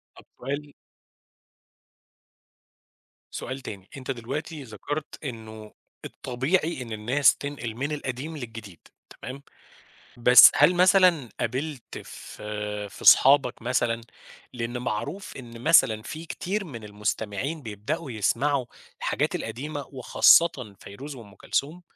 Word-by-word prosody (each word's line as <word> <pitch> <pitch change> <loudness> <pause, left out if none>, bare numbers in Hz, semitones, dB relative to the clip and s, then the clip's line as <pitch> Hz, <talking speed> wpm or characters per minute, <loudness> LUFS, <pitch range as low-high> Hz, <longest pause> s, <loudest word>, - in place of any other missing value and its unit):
طب - - -16
سؤال 140 +3 -5 2.6
سؤال 130 +2 -5
تاني، 100 -7 -9
أنت 135 0 -4
دلوقتي 140 +5 -5
ذكرت 145 +7 -6
إنه 110 -5 -8 0.3
الطبيعي 135 +5 -1
إن 120 -2 -7
الناس 120 +7 +3
تنقل 140 -6 -6
من 140 +5 -3
القديم 145 +2 -4
للجديد 110 - -9 0.4
تمام؟ 135 +2 -7 0.8
بس 125 +1 +9
هل 150 +5 +5
مثلًا 180 -6 +5
قابلت 130 +3 -4
في 105 -1 -6
في - - -13
أصحابك 135 -3 +6
مثلًا 120 -1 0 0.5
لأنه 120 0 -4
معروف 145 - -4
إن 120 -3 -10
مثلًا 125 -7 +4
في 155 +8 -7
كثير 190 +4 -3
من 120 - -9
المستمعين 105 +7 -3
يبدأوا 130 - -4
يسمعوا 125 +5 0 0.3
الحاجات - - -1
القديمة 140 +5 -5
وخاصة 130 -3 +4
فيروز 140 +9 -9
وأُم 110 -6 -13
كلثوم 150 - -2
130 Hz, 110 wpm, -26 LUFS, 115-150 Hz, 2.6 s, بس